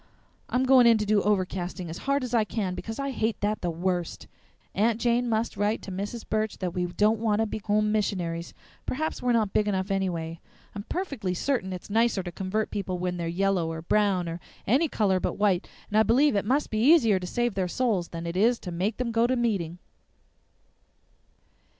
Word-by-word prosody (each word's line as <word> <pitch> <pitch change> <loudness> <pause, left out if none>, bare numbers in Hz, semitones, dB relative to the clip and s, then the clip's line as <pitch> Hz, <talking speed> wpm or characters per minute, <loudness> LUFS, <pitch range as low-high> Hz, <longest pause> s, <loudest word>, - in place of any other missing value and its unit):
I'm 250 +1 +1
going 260 -2 +6
in 230 -1 +6
to 210 - -1
do 205 0 +3
overcasting 185 -3 -1
as 165 +1 -6
hard 280 -1 +2
as 250 -1 -5
I 230 -2 +4
can, 205 -3 -2
because 225 +4 -6
I 275 0 -2
hate 220 -4 -1
that 210 +1 -1
the 175 - -1
worst. 175 +1 -2 0.5
Aunt 220 +2 +2
Jane 240 +1 +1
must 225 +1 0
write 205 +2 0
to 195 - -7
Mrs. 205 +5 -5
Burch 215 0 -1
that 180 -3 -3
we 180 -1 -1
don't 210 +5 +2
want 215 -2 +1
to 225 - +2
be 220 - -4
home 210 0 +1
missionaries. 175 -6 -2 0.3
Perhaps 315 +4 -2
we're 250 - +1
not 215 -4 +1
big 210 - +2
enough, 190 -1 -1
anyway. 170 -4 -2 0.3
I'm 205 - -5
perfectly 275 - -2
certain 215 -3 -1
it's 180 -1 -7
nicer 225 -3 +2
to 175 - -6
convert 195 +4 -2
people 195 -3 -3
when 180 0 -2
they're 170 -1 -3
yellow 180 -1 0
or 160 0 -6
brown 195 -1 +2
or 165 +1 -4 0.3
any 275 +9 +3
color 200 -8 +1
but - - -2
white; 200 -3 +1 0.2
and - - -2
I 215 - +6
believe 250 +4 +4
it 200 - 0
must 275 +6 +1
be 215 - 0
easier 230 - +5
to 180 - -6
save 240 +3 0
their 190 -2 -1
souls 200 -4 0
than 165 0 -7
it 170 +1 -4
is 230 +6 +3
to 180 - -6
make 190 +6 -1
them 250 -2 -2
go 230 +1 +3
to 255 - +1
meeting." 195 -9 -1
205 Hz, 210 wpm, -27 LUFS, 180-230 Hz, 0.5 s, going